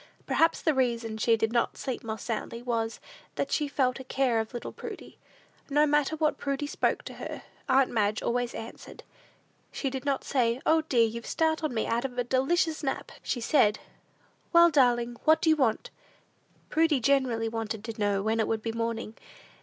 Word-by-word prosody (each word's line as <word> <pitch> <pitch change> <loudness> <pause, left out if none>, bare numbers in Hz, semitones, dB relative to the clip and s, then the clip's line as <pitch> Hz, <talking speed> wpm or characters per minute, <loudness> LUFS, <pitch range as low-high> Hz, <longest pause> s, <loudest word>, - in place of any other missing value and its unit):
Perhaps 330 0 +2
the 315 - +3
reason 235 -4 -1
she 225 +1 +3
did 225 +1 -1
not 235 - +1
sleep 260 -3 -4
more 220 -1 -4
soundly, 230 +1 -4
was, 230 -2 -2 0.4
that - - -2
she 295 - +1
felt 260 -2 0
a - - -7
care 255 -3 +1
of 220 0 -3
little 240 - -6
Prudy. - - -9 0.5
No 295 +2 +4
matter 295 +1 +2
when 310 -1 +1
Prudy 280 +1 -3
spoke 290 - 0
to - - -8
her, - - -7 0.3
aunt 265 0 +4
Madge 210 -2 0
always 245 0 -1
answered. 225 - -9 0.7
She 270 - -3
did 265 -1 -4
not 280 -2 -1
say, 240 -2 +1
"O, 320 0 +4
dear, 250 -7 +3
you've 230 +1 -5
startled 315 -2 0
me 225 -3 -1
out 235 +2 0
of 255 -2 -5
a 245 - +1
delicious 310 +6 +1
nap!" 270 -3 -3
She 245 - -2
said, 215 -5 +3 0.7
"Well, 340 0 +7
darling, 240 -4 +2
what 315 0 +6
do 320 - +3
you - - +5
want?" 250 -7 0 0.8
Prudy 320 -3 +3
generally 250 -3 +2
wanted 225 -1 -4
to 225 -1 -7
know 200 -1 +1
when 220 +1 0
it 220 - +1
would 220 -1 -1
be 225 - -2
morning? 230 -1 -3
245 Hz, 185 wpm, -28 LUFS, 225-285 Hz, 0.8 s, Well